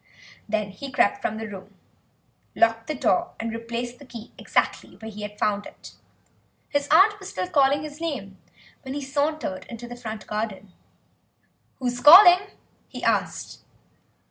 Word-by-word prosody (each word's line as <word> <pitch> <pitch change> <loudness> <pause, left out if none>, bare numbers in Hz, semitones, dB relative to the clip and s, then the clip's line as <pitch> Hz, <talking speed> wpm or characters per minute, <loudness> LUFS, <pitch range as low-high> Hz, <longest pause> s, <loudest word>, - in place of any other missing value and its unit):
Then 210 -2 -1
he 265 +8 -8
crept 205 - +2
from 215 - -2
the 225 0 -5
room, 195 -2 -11 0.8
locked 225 0 +2
the 310 - -2
door, 345 +6 0
and 225 0 -3
replaced 235 +1 -5
the 285 - -13
key 235 -2 -10
exactly - - -1
where 220 0 -9
he 210 0 -9
had 210 0 -7
found 205 -1 -1
it. - - -13 0.8
His 285 -1 -1
aunt 410 +6 +5
was 385 - -8
still 185 0 -3
calling 280 +1 +3
his 305 +1 -9
name 205 -13 -5 0.4
when 265 0 -6
he 290 - -3
sauntered 285 -6 -2
into 240 0 -8
the 240 - -8
front 220 -3 -7
garden. 210 -3 -5 1.0
"Who's 245 -2 -2
calling?" 360 +6 +9 0.4
he - - -9
asked. - - -1
240 Hz, 155 wpm, -24 LUFS, 215-290 Hz, 1.0 s, calling